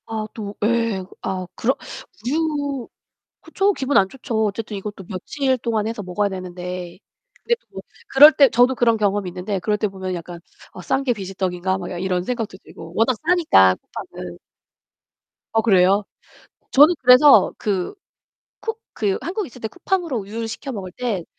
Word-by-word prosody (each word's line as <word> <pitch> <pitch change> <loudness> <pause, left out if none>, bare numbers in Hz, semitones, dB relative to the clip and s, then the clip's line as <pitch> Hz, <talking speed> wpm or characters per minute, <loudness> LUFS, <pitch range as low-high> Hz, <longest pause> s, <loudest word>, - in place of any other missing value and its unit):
아 220 -1 -4
또 205 -2 -6
예. 230 -3 +1 0.2
아 185 -1 -3
그런 260 +4 +1 0.5
우유 285 -2 -1 0.5
그쵸. 390 +5 +1
기분 275 -3 0
안 190 - +5
좋죠. 225 -1 -2
어쨌든 210 0 -4
이것도 200 0 -7
며칠 260 +8 -1
동안 225 -3 -1
해서 225 -2 -4
먹어야 200 +2 -1
되는데 180 -1 -6 0.4
근데 475 - -1
또 - - -39
뭐 - - -7 0.3
그럴 295 -2 +9
때 280 -4 +5
저도 245 +3 +4
그런 235 -2 +3
경험이 205 -2 0
있는데 185 +2 -3
그럴 210 +4 0
때 210 - 0
보면 190 -1 -5
약간 175 0 -7 0.3
'아, 185 - -9
싼 265 +9 0
게 255 -3 +1
비지떡인가?' 190 -2 -2
막 185 0 -6
아 180 - -5
이런 180 0 -1
생각도 225 -3 -4
들고 165 +1 -12
워낙 235 +3 +2
싸니까 305 - +5
쿠팡은 - - -9 1.2
어 225 - +3
그래요? 195 -2 +4 0.7
저는 300 +6 +7
그래서 255 +3 +7
그 195 - -2 0.7
쿠 450 - -3 0.2
그 200 -3 0
한국에 375 +5 -3
있을 250 +1 -15
때 220 - -3
쿠팡으로 355 - -2
우유를 220 +3 -5
시켜 270 +4 -6
먹을 195 -5 -6
때 220 -7 -3
215 Hz, 315 characters per minute, -21 LUFS, 190-260 Hz, 1.2 s, 그럴